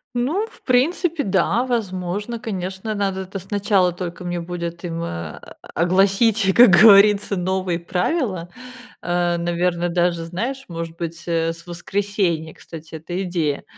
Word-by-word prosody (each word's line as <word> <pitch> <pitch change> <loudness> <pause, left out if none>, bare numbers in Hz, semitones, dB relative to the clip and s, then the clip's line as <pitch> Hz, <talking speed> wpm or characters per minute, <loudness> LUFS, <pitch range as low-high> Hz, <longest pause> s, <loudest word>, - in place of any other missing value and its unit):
Ну, 300 - 0
в - - -18
принципе, 310 +5 +1
да, 195 +5 +1
возможно, 205 -1 -3
конечно, 195 -1 -4
надо 195 -1 -1
это 190 +1 -6
сначала 195 -1 +1
только 175 0 -6
мне 175 0 -2
будет 170 0 -5
им, 170 -1 -4
э, - - -2 0.3
а, - - -10 0.4
огласить, 195 +3 +3
как 245 -1 +9
говорится, 205 -1 +6
новые 185 -1 -1
правила. 185 - -1 0.5
А 175 -1 0
наверное, 175 0 0
даже, 175 -1 +1
знаешь, 240 +11 -4
может 165 -1 -6
быть, 170 0 -5
э, 165 -1 0
с 170 +1 -14
воскресенья, 175 -2 -2
кстати, 160 -1 -11
эта 175 +4 -4
идея, 165 -6 -1
185 Hz, 140 wpm, -21 LUFS, 170-205 Hz, 0.5 s, как